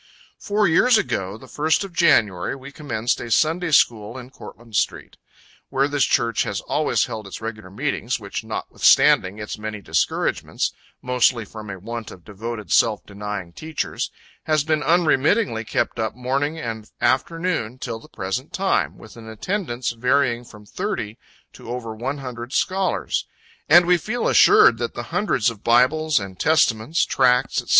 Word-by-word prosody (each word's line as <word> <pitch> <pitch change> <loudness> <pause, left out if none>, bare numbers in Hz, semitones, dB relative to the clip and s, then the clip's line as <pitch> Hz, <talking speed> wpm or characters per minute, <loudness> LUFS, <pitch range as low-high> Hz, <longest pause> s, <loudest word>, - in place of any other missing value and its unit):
Four 210 0 +1
years 225 +9 +5
ago, 105 - -2
the 130 - -14
1st 155 +7 0
of 195 -3 -8
January, 105 - +3
we 135 +1 -11
commenced 120 -6 -2
a 120 - -6
Sunday 165 +8 +2
school 115 -5 +2
in 125 0 -10
Courtland 115 -4 -12
street, - - -1 0.5
where 135 +1 +1
this 145 -2 +1
church 115 -1 +1
has - - -2
always - - +1
held 110 -2 -7
its 95 - -8
regular 110 -3 -7
meetings, 125 +3 -2
which 100 +1 -5
notwithstanding 105 -3 +3
its 105 0 -6
many 105 0 -5
discouragements 80 -5 -1 0.3
mostly 125 -2 +2
from 105 +1 -10
a 95 - -5
want 115 +4 -6
of 90 - -13
devoted 105 -1 -7
self 110 -2 +3
denying 100 -3 -6
teachers 155 - -4 0.4
has 155 -2 +2
been 155 0 0
unremittingly 155 - +2
kept 115 - -2
up 110 -1 -2
morning 135 +5 -1
and 110 -7 -6
afternoon, 155 -3 0
till 120 -3 -5
the - - -17
present 95 +9 -4
time, 195 0 0
with 110 - -14
an 115 -1 -11
attendance 125 - -3
varying 125 0 +1
from 105 -3 -15
thirty 110 - -4 0.3
to - - -12
over 120 -2 -4
one 130 +6 -4
hundred 125 -1 -7
scholars; 185 - 0 0.4
and 175 +3 +8
we 180 0 +4
feel 220 +9 -2
assured 115 - +6
that 120 -1 -3
the 120 - -4
hundreds 130 - +1
of 110 -2 -14
Bibles 140 +6 +3
and 95 -2 -8
Testaments, 155 -1 +2
tracts, 125 -1 +2
&c. - - -22
120 Hz, 160 wpm, -22 LUFS, 110-155 Hz, 0.5 s, and